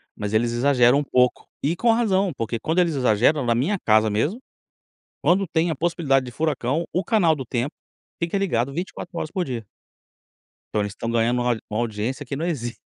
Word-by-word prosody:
mas 105 0 -4
eles 115 +2 +2
exageram 125 +1 +4
um - - -1
pouco. 125 -2 +1 0.2
E 155 +4 +1
com 235 +5 +3
razão, 200 -5 +2
porque 115 0 -2
quando 160 +10 0
eles 170 -2 +2
exageram, 130 +3 +3
na 120 -1 +2
minha 155 - +1
casa 110 0 +4
mesmo, 145 - 0 0.8
quando 190 +3 +3
tem 160 +1 +1
a 160 - -1
possibilidade 140 -4 +1
de 125 - -7
furacão 155 +1 -1
o 185 - +1
canal 170 -5 +3
do 135 -3 -6
tempo 125 +4 -2 0.5
fica 170 +3 -1
ligado 140 -10 0
24 175 +2 -6
horas 155 - -3
por 185 -3 -1
dia. 120 -5 -5 1.1
Então 105 - +2
eles 100 -1 -3
estão 115 +1 -4
ganhando 120 +1 +2
uma 120 0 +2 0.2
uma 105 - -2
audiência 120 +5 -3
que 135 - -4
não 160 - -2
existe. 125 -9 -3
135 Hz, 195 wpm, -23 LUFS, 120-170 Hz, 1.1 s, exageram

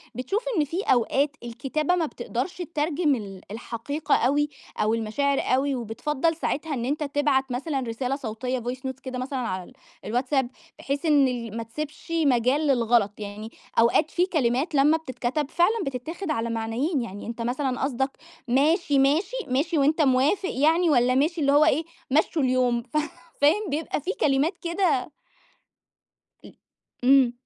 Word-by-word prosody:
بتشوف 260 - -2
إن 305 - +3
في 335 +7 -3
أوقات 270 +4 +2
الكتابة 270 +8 -1
ما 340 -2 +1
بتقدرش 345 +4 -4
تترجم 310 -3 0
ال 195 -5 -7
الحقيقة 235 +7 -2
أوي 290 +4 +2 0.3
أو 215 +1 +1
المشاعر 270 +6 0
أوي 270 +2 +1
وبتفضّل 265 +7 -1
ساعتها 315 -1 -2
إن 240 -3 -2
أنت 295 +4 -1
تبعت 280 -2 +1
مثلًا 270 +3 -2
رسالة 250 +2 -2
صوتية 250 0 -3
voice 245 +2 -4
notes 260 0 -5
كده 255 -1 -5
مثلًا 260 +1 -3
على 185 -7 -3
ال 215 - -16 0.3
الواتساب 255 +2 0 0.3
بحيث 280 +3 -3
إن 290 -4 +5
ال 230 -3 -4
ما 230 - -3
تسبش 300 +7 -7
مجال 265 +3 +2
للغلط؟ 230 -5 +2
يعني 210 +2 -7 0.3
أوقات 235 +7 +3
في 355 - +2
كلمات 290 -3 0
لمّا 295 +3 +5
بتتكتب 275 -1 -3
فعلًا 375 +6 +2
بتتاخد 310 +7 -4
على 235 -4 -1
معنيين، 230 +7 -1
يعني 205 -3 -7
أنت 230 0 -5
مثلًا 250 +2 -1
قصدك 265 0 0 0.4
ماشي، 285 +3 +3
ماشي، 315 - +2
ماشي 295 +6 0
وأنت 300 +3 +3
موافق 290 +8 +2
يعني 325 +5 +3
والّا 250 -3 +3
ماشي 315 +5 +1
اللي 280 -1 +3
هو 295 +2 +6
إيه، 320 0 +2 0.3
مشُّوا 310 +2 +2
اليوم 250 -2 +2
ف 305 - -4 0.4
فاهم؟ 350 +8 +3
بيبقى 300 +1 -2
في 360 - -2
كلمات 295 +5 +2
كده 340 -6 0 1.3
أ - - -12 0.5
إمم. 260 -2 +5
275 Hz, 155 wpm, -25 LUFS, 245-305 Hz, 1.3 s, هو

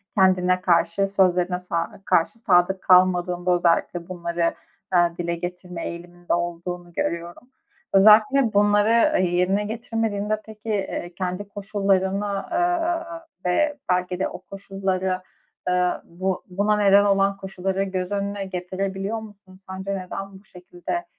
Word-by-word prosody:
kendine 185 -1 +3
karşı, 180 +1 +2
sözlerine 180 -2 +2
sa 170 0 -4
karşı 170 +6 +1
sadık 190 -3 +3
kalmadığında 180 -1 +3
özellikle 175 0 +1
bunları, 170 -1 -1 0.4
ııı, 175 -1 +3
dile 170 0 -2
getirme 180 0 -6
eğiliminde 175 +1 -5
olduğunu 175 0 -4
görüyorum. 170 +9 -4 0.4
Özellikle 215 +5 +6
bunları 205 +1 +4
yerine 180 +3 +1
getirmediğinde, 215 -1 -2
peki, 220 0 -10
eee, 190 -4 -3
kendi 185 +2 -3
koşullarına, 200 -1 -1
ııı, 340 -1 -1 0.2
ve 295 +12 +1
belki 180 0 0
de - - +1
o - - -9
koşullara, 190 -1 -3 0.4
aaa, 180 0 +1
bu 185 +2 -3
buna 205 +3 +1
neden 200 0 +5
olan 195 0 +2
koşulları 195 0 -2
göz 185 -1 -3
önüne 200 0 -2
getirebiliyor 190 +3 -3
musun? 200 -3 -14
Sence 190 +1 -5
neden 195 +1 -7
bu - - -24
şekilde 180 - -6
190 Hz, 120 wpm, -23 LUFS, 180-205 Hz, 0.4 s, Özellikle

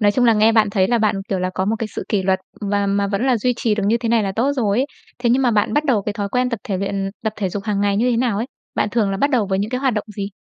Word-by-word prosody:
Nói 205 -1 +4
chung 250 +2 +2
là 230 - +6
nghe 215 +1 +4
bạn 215 -2 +3
thấy 190 -2 +2
là 240 -1 +2
bạn, 215 -1 +2
kiểu, 190 - -1
là 185 0 -1
có 190 - 0
một 220 +3 0
cái 225 - -2
sự - - -6
kỷ 200 -3 +1
luật 190 0 +1 0.2
và 200 -1 0
mà 200 0 +1
vẫn 200 +6 -1
là 255 -2 +3
duy 250 +3 +1
trì 220 -3 +1
được 210 - -2
như 230 +3 +3
thế 230 -1 -3
này 230 -2 +3
là 195 - -2
tốt 265 +5 +2
rồi 225 -5 0
ấy. 270 - +1 0.3
Thế 240 -1 +1
nhưng 265 +2 +3
mà 245 - +3
bạn 210 -2 +1
bắt 295 +1 +1
đầu 245 -9 +2
cái 210 - -3
thói 205 -1 -3
quen 250 +3 0
tập 235 - -3
thể 200 -6 -2
luyện 195 0 -2
tập 220 -1 -1
thể 195 -2 -1
dục 195 +2 -5
hàng 205 -2 -1
ngày 200 -1 +1
như 245 +4 +2
thế 235 - +1
nào 235 -4 +1
ấy? 230 +4 -2 0.3
Bạn - - +1
thường 220 -4 +1
là 195 - -1
bắt 280 +8 +1
đầu 235 -7 +2
với 190 0 0
những 205 +2 -2
cái 250 0 -2
hoạt 265 -4 +1
động 210 - -2
gì? 200 -1 -3
210 Hz, 355 wpm, -20 LUFS, 200-240 Hz, 0.3 s, là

